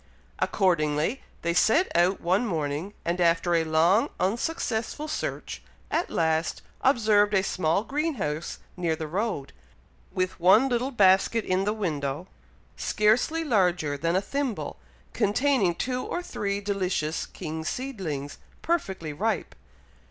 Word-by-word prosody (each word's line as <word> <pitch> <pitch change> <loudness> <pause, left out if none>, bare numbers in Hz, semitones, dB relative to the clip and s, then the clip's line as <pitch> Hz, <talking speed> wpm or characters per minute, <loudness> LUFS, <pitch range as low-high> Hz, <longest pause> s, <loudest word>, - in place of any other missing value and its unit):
Accordingly, 170 - +1 0.2
they 170 0 +1
set 225 - +3
out 175 +3 +3
one 185 +7 +1
morning; 160 +2 -3
and 175 +1 0
after 170 0 +3
a 165 -1 +3
long, 170 - +3
unsuccessful 235 - -1
search, 305 - -4 0.3
at 335 - 0
last 160 0 0 0.2
observed 215 -5 +4
a 190 - +3
small 180 0 +1
green 300 +5 -1
house 150 - -3 0.2
near 170 -3 0
the 160 - -5
road, 180 -3 -3 0.6
with 185 0 -2
one 195 +9 +6
little 245 +1 0
basket 205 -1 +4
in 185 +1 +1
the 210 - +1
window, 155 -6 -2 0.5
scarcely 240 +10 +2
larger 180 - +1
than 165 +4 0
a 190 - +3
thimble, 275 0 -3 0.3
containing 210 -3 +2
two 250 +6 -2
or 350 - -3
three 200 -10 -2
delicious 185 -6 -1
King 160 +1 -6
seedlings, 165 - -4 0.2
perfectly 190 - -1
ripe. 220 +9 -1
190 Hz, 130 wpm, -26 LUFS, 165-230 Hz, 0.6 s, one